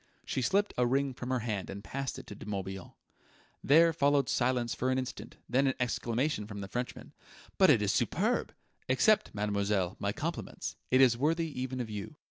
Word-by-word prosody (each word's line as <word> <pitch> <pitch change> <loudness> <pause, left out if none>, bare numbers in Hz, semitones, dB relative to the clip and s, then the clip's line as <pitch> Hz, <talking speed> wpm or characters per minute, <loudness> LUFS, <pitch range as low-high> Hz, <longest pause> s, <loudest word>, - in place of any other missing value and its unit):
She 130 - -2
slipped 200 +11 +1
a 125 - +4
ring 135 +1 +1
from 125 0 -6
her 130 -2 0
hand 105 -4 -3
and 100 +1 -7
passed 135 +3 -4
it - - -9
to - - -9
De 105 - -11
Morbihan. 95 -2 -5 0.7
There 165 +4 +6
followed 145 -2 +2
silence 120 -1 +1
for 130 - -1
an 130 - +1
instant, 130 -1 -5
then 135 +3 +2
an 135 - +1
exclamation 120 -1 -1
from 100 -1 -7
the 100 - -5
Frenchman: 125 +5 -5 0.5
"But - - +7
it - - +5
is - - +1
superb! - - 0 0.4
Accept, 210 +12 +4
mademoiselle, 100 -3 0
my - - 0
compliments. - - -4
It 130 +1 +5
is 120 -3 +5
worthy 165 +3 +1
even 130 0 -3
of 115 -3 -4
you." 105 +8 -6
125 Hz, 190 wpm, -31 LUFS, 105-135 Hz, 0.7 s, But